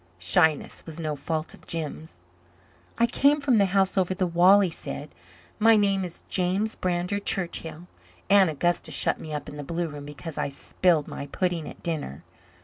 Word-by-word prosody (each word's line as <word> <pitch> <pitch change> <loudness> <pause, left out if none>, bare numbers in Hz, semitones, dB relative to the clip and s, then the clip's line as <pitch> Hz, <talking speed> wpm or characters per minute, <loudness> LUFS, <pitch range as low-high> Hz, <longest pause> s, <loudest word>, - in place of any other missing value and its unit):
Shyness 150 - +1
was 160 0 -8
no 155 -2 -2
fault 155 +3 -3
of - - -17
Jims. 160 -1 -5 0.8
"I 235 - +4
came 280 +5 +3
from 265 -6 +3
the 200 - +4
house 190 0 +2
over 185 0 0
the 185 -1 +1
wall," 180 +4 +6
he 185 -4 +1
said. 150 -2 -7 0.5
"My 225 +1 +6
name 200 -2 +2
is 175 -2 -8
James 190 +4 0
Brander 180 +2 -1
Churchill. 175 -4 -3 0.4
Aunt 195 -3 +6
Augusta 175 +3 0
shut - - 0
me 155 - -8
up 150 -1 -4
in 145 - -8
the 145 - -5
blue 170 +3 -2
room 145 -2 -8
because 150 +2 -7
I - - -1
spilled 155 +2 +1
my 140 - -6
pudding 175 +1 -2
at - - -13
dinner. 145 - -4
175 Hz, 180 wpm, -26 LUFS, 155-195 Hz, 0.8 s, wall